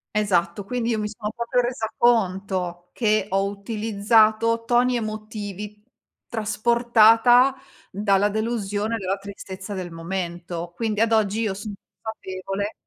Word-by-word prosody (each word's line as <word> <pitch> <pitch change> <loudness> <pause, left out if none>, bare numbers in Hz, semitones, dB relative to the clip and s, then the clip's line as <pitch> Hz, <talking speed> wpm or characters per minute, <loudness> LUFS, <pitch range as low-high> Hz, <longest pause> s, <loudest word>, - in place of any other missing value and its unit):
Esatto. 190 -2 +1
Quindi 240 +1 -2
io 220 -2 0
mi 210 - -1
sono 215 0 -5
proprio 235 +1 0
resa 240 -2 -2
conto, 190 -6 +1
che 215 -3 +1
ho 195 +1 +1
utilizzato 220 +2 +2
toni 245 +1 +3
emotivi, 210 -2 -5 0.4
trasportata 235 +3 +4 0.4
dalla 200 0 +2
delusione 215 0 -1
e - - -1
dalla 195 +1 -1
tristezza 195 0 -8
del 180 -2 -5
momento. 175 0 -5
Quindi 220 -2 -1
ad 230 0 +3
oggi 220 0 +2
io 210 -4 0
son 205 +1 -7 0.3
consapevole 200 -1 -4
210 Hz, 125 wpm, -23 LUFS, 195-225 Hz, 0.4 s, trasportata